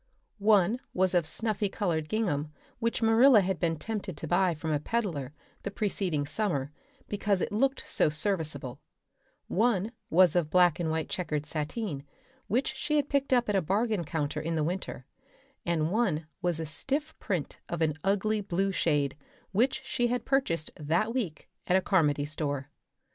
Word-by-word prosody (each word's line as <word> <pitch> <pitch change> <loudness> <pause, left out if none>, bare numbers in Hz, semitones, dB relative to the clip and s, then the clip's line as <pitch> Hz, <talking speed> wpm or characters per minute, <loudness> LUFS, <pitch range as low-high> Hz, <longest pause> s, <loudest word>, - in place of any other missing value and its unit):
One 210 +2 +4 0.2
was 185 0 +3
of 175 -3 +2
snuffy 210 +2 0
colored 165 -7 -1
gingham 155 -9 -1 0.3
which 230 0 -1
Marilla 225 +1 +7
had 190 -2 -1
been 165 -1 0
tempted 205 -2 -4
to 160 - -5
buy 175 +1 +2
from 160 +1 -3
a 150 - +1
peddler 160 - -2 0.3
the - - -3
preceding 195 -7 -1
summer 145 -4 -1 0.4
because 205 -1 0
it - - -2
looked 265 +6 0
so - - +3
serviceable; 150 -5 -1 0.7
one 220 0 +1 0.2
was 180 0 +5
of 170 -4 +2
black 175 0 +4
and 165 -2 0
white 160 -1 -1
checkered 150 -5 -2
sateen 150 - -3 0.4
which 255 +5 0
she 295 +3 -1
had 290 -1 +1
picked 280 -1 0
up 245 -1 +4
at 210 - +1
a 195 - +3
bargain 205 +3 0
counter 155 -1 -2
in 165 +2 -2
the 155 - +1
winter; 170 -6 -3 0.6
and 165 -1 +1
one 190 -8 +1 0.2
was 175 -2 +1
a 160 - -2
stiff 275 - -2
print 175 -7 -3
of 170 -1 -1
an 155 -1 +2
ugly 205 +2 +1
blue 195 0 0
shade 145 -6 +1 0.4
which 245 +6 +1
she 240 -2 0
had 245 0 -2
purchased 215 - 0
that 170 +10 0
week 195 - -3 0.2
at 180 - +3
a - - +6
Carmody 150 -7 +2
store. 145 -2 -3
180 Hz, 170 wpm, -29 LUFS, 155-215 Hz, 0.7 s, Marilla